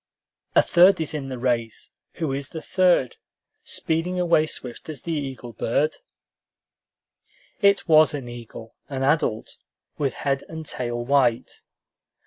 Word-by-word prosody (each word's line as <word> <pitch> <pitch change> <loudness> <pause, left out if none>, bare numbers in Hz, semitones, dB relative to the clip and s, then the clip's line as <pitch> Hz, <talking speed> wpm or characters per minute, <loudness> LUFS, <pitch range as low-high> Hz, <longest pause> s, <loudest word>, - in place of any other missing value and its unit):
"A - - +6
third 180 +2 +5
is 160 -1 -1
in 140 -3 -4
the 130 - -5
race! 120 -3 -2 0.2
Who 155 -5 -3
is 135 0 -4
the 160 - -6
third, 180 -7 +2 0.5
Speeding 170 +3 -1
away 170 -3 +3
swift 125 0 -3
as 155 - -7
the 170 - -4
eagle 135 -6 -5
bird?" 140 +8 0 1.6
It 200 -1 +3
was 155 -2 +5
an 135 -4 -6
eagle, 115 -1 -10 0.2
an 135 -2 -3
adult, 140 -6 0 0.4
with 140 -3 0
head 135 -1 0
and 160 -1 -7
tail 120 -3 -4
white. 130 -3 +1
140 Hz, 135 wpm, -24 LUFS, 125-160 Hz, 1.6 s, A